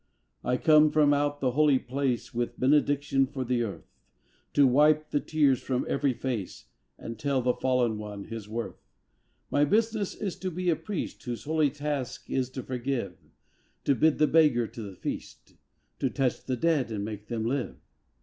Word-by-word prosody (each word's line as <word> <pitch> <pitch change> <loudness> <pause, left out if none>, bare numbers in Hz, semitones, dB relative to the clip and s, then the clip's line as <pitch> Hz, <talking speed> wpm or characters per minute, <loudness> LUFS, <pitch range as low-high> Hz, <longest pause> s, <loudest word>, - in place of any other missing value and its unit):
I 125 +1 +1
come 155 +2 +6
from 150 -1 +4
out 145 0 0
the 130 -2 +2
Holy 145 0 +4
Place 130 -1 -2
With 120 0 -3
benediction 140 0 +2
for 135 -1 -4
the 120 0 0
earth, 110 -4 -4 0.7
To 145 - +5
wipe 150 +4 +4
the 145 - +2
tears 145 -6 +2
from 130 -1 -1
every 140 -2 +1
face 115 -8 -4 0.3
And 115 -1 -8
tell 140 0 +1
the 125 0 +2
fallen 125 -5 +1
one 105 -1 -7
his 110 -1 -8
worth. 115 +1 -5 0.7
My 145 - +3
business 215 +4 +1
is 195 -4 -4
to 190 - -3
be 180 0 0
a - - +2
priest 205 0 -5
Whose 120 -2 -4
holy 155 -1 +2
task 145 -2 -4
is 130 -2 0
to 130 -1 -6
forgive, 125 -6 -3 0.7
To 140 - +3
bid 155 +4 +3
the 155 - +4
beggar 150 -7 +4
to 115 - -9
the 100 -3 -8
feast, - - -7 0.5
To 135 - +1
touch 130 -1 -1
the 130 -1 -1
dead 145 -4 +1
and 100 -2 -3
make 105 -1 -7
them 115 -2 -3
live. 130 +2 -2
135 Hz, 180 wpm, -28 LUFS, 120-150 Hz, 0.7 s, come